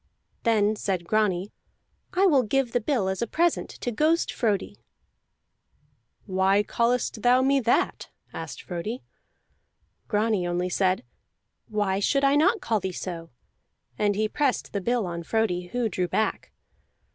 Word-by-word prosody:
Then 215 -2 +2
said 190 -4 -2
Grani: 200 -1 +1 0.6
"I 375 +2 +3
will 290 -8 +5
give 250 +2 0
the 245 - +1
bill 220 -5 0
as 190 +2 -2
a 235 - 0
present 340 +7 +1
to 245 - -2
Ghost 310 +8 +1
Frodi." 210 -6 -1 1.4
"Why 190 +1 +2
callest 235 0 0
thou 250 +2 +4
me 275 +1 +3
that?" 235 -2 0 0.2
asked - - -7
Frodi. 205 +7 -5 1.0
Grani 210 -4 +1
only 175 +1 -1
said, 185 0 +1 0.6
"Why 205 -3 0
should 275 +7 +1
I 275 +1 +4
not 380 +10 +3
call 225 -2 0
thee 190 -1 -3
so?" 170 -2 -6 0.7
and 205 +4 +1
he 215 +1 +1
pressed 275 +3 -1
the 200 - -1
bill 235 +1 0
on 170 -1 -4
Frodi, 180 -2 -1
who 245 +4 -1
drew 180 -3 -1
back. 220 +4 -1
215 Hz, 145 wpm, -26 LUFS, 190-245 Hz, 1.4 s, will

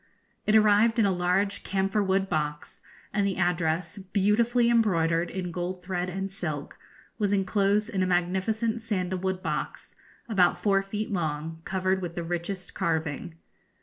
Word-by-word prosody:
It 215 - +4
arrived 215 +2 +5
in 225 - +4
a 195 - +3
large 185 +3 0
camphor 195 +2 0
wood 195 0 +1
box, 150 -3 -3 0.3
and 200 0 +2
the 195 -1 0
address, 175 +1 0
beautifully 215 +5 +2
embroidered 175 -8 +2
in 180 -2 -4
gold 180 +1 -4
thread 180 -1 -2
and 195 +1 -4
silk, 155 -7 -5 0.4
was 205 -2 +1
enclosed 200 +1 +2
in 200 -5 -2
a 185 - +2
magnificent 190 +6 0
sandal 190 -5 -2
wood 190 0 -2
box - - -4 0.3
about 190 -6 +3
four 195 -2 +2
feet 210 +2 -4
long, 160 -2 -3
covered 190 0 0
with 170 -2 -5
the 175 - -3
richest 175 +2 -4
carving. 160 -1 -2
190 Hz, 150 wpm, -27 LUFS, 175-205 Hz, 0.4 s, arrived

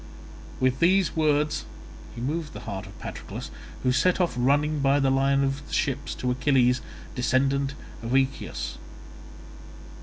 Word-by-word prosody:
With 130 0 +2
these 185 +2 +3
words 150 -1 +2 0.5
he 115 - -6
moved 150 +4 -2
the - - -8
heart 95 -1 -5
of - - -13
Patroclus, - - -7 0.3
who 125 - +3
set 180 +9 +3
off 175 -7 +2
running 145 +4 +2
by 140 +1 +3
the 135 -1 +3
line 135 +1 +3
of 135 +2 -2
the - - -10
ships 140 -6 -1
to 125 - -1
Achilles, 125 -1 +3 0.3
descendant 135 +2 +1 0.3
of 115 +3 -1
Aeacus. 135 0 -1
135 Hz, 145 wpm, -26 LUFS, 130-150 Hz, 0.5 s, these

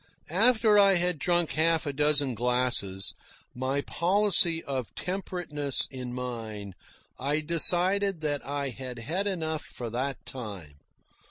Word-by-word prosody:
After 220 +2 +3
I 195 -1 +5
had 175 -2 0
drunk 175 +1 +1
half 160 +1 +1
a 145 - -3
dozen 145 -2 +2
glasses, 120 -5 +1 0.4
my 130 +3 -2
policy 175 -1 +1
of 130 -4 -5
temperateness 175 -7 -2
in 125 -2 -7
mind, 115 -5 -7 0.5
I 145 +4 -1
decided 180 +3 +5
that 145 -2 -2
I 140 0 -4
had 125 0 -8
had 170 - -3
enough 160 -5 -3
for 120 -2 -8
that 130 +3 -4
time. 100 - -9
145 Hz, 125 wpm, -27 LUFS, 125-175 Hz, 0.5 s, I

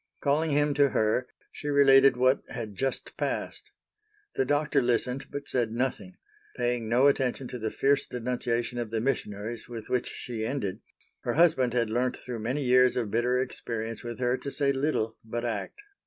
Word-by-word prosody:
Calling 155 +3 +1
him 145 0 +2
to 140 0 +4
her 110 +2 +1 0.2
she 150 - -8
related 135 -2 +6
what 130 +1 +3
had 115 -5 -5
just 135 +6 -3
passed. - - -3 0.6
The 135 - +1
Doctor 145 0 +2
listened, 125 +2 0
but 145 0 -6
said 120 -4 0
nothing; 130 +10 -3 0.4
paying 120 -2 -1
no 125 +4 +4
attention 135 -2 +2
to 125 - -5
the 110 0 -2
fierce 140 +4 +1
denunciation 120 -1 -2
of 120 -2 -3
the 110 0 -1
missionaries 110 -2 -3
with 115 -2 -7
which 125 - 0
she 115 -3 -5
ended; 110 -6 -2 0.4
her - - -2
husband 140 -7 +4
had 115 -3 +1
learnt 125 +2 0
through 125 -2 -6
many 125 +7 -2
years 125 0 +5
of 115 -5 -2
bitter 120 +2 +2
experience 115 -3 -4
with 120 -1 -5
her 125 0 +1
to 140 - -5
say 140 0 +1
little 135 -5 -1
but 120 +2 -4
act. 115 - -4
125 Hz, 175 wpm, -28 LUFS, 115-135 Hz, 0.6 s, related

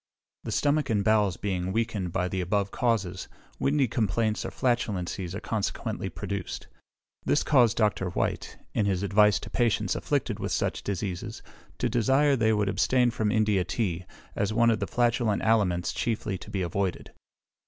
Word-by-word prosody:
The - - -3
stomach 145 0 +1
and 105 -3 +1
bowels 105 -5 +3
being 95 -2 -2
weakened 105 -4 -1
by 90 +1 0
the 95 +1 -2
above 100 +2 0
causes, 100 -7 -1 0.3
windy 140 -1 +2
complaints 110 -1 0
or - - -3
flatulencies 95 -7 -1
are - - -3
consequently 110 -2 -3
produced. - - -5 0.6
This 145 - +2
caused 125 -7 +4
Dr. 105 -4 +1
Whytt, - - -2 0.2
in 105 - +1
his 95 -1 0
advice 105 +1 +4
to - - -9
patients 120 -3 +1
afflicted - - -1
with - - -3
such - - -1
diseases, 95 -2 -4 0.3
to 125 - 0
desire 135 +5 +3
they 110 -3 +2
would 105 -2 +1
abstain 125 +4 +2
from 110 -2 0
India 105 -4 +2
tea, 90 -2 -2 0.3
as 100 +1 0
one 115 +1 +4
of 110 - 0
the 100 - -2
flatulent 120 -3 +1
aliments 95 -6 +2
chiefly 110 -3 -2
to - - -9
be 95 -2 -2
avoided. 90 +1 -2
105 Hz, 165 wpm, -27 LUFS, 95-115 Hz, 0.6 s, caused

